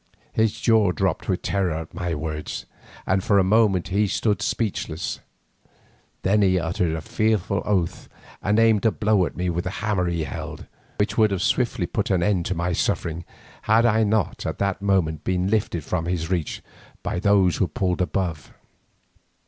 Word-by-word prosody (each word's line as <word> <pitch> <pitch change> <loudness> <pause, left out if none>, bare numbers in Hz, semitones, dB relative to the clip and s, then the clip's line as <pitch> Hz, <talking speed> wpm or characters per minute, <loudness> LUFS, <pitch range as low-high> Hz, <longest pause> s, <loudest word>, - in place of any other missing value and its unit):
His 110 -1 +1
jaw 110 -5 +4
dropped 90 0 -1
with 95 - 0
terror 95 -4 0
at 80 0 -6
my 85 -2 -2
words, 75 0 -5 0.4
and 95 0 +1
for 100 - +3
a 95 - +5
moment 100 -2 +3
he 100 +2 +2
stood 105 0 0
speechless. 95 -6 -2 1.0
Then 105 +3 +3
he 95 -2 +3
uttered 85 0 -1
a 80 - -4
fearful 105 +1 0
oath 95 -5 -1 0.3
and 105 +2 +1
aimed 115 -2 +4
a - - +3
blow 105 -5 +2
at - - -10
me 90 +1 -1
with 85 +1 -2
the - - -1
hammer 100 -2 -1
he 85 -2 -1
held, - - -6 0.3
which 105 +2 0
would 105 -4 +3
swiftly 115 0 +1
have - - -13
put 105 - 0
an 95 -3 +2
end 95 -4 +1
to 95 - -1
my 85 +2 -1
sufferings 85 0 -1 0.4
had 110 +2 +3
I 110 -1 +4
not 105 -2 0
at - - -3
that 100 -1 -1
moment 90 -6 +1
been 95 +1 0
lifted 100 -7 0
from 85 +1 -2
his 85 -1 -2
reach 85 -5 -2 0.4
by - - -2
those 100 -2 +3
who 95 - +2
pulled 90 +2 -1
above. 90 -4 -2
95 Hz, 180 wpm, -24 LUFS, 85-105 Hz, 1.0 s, a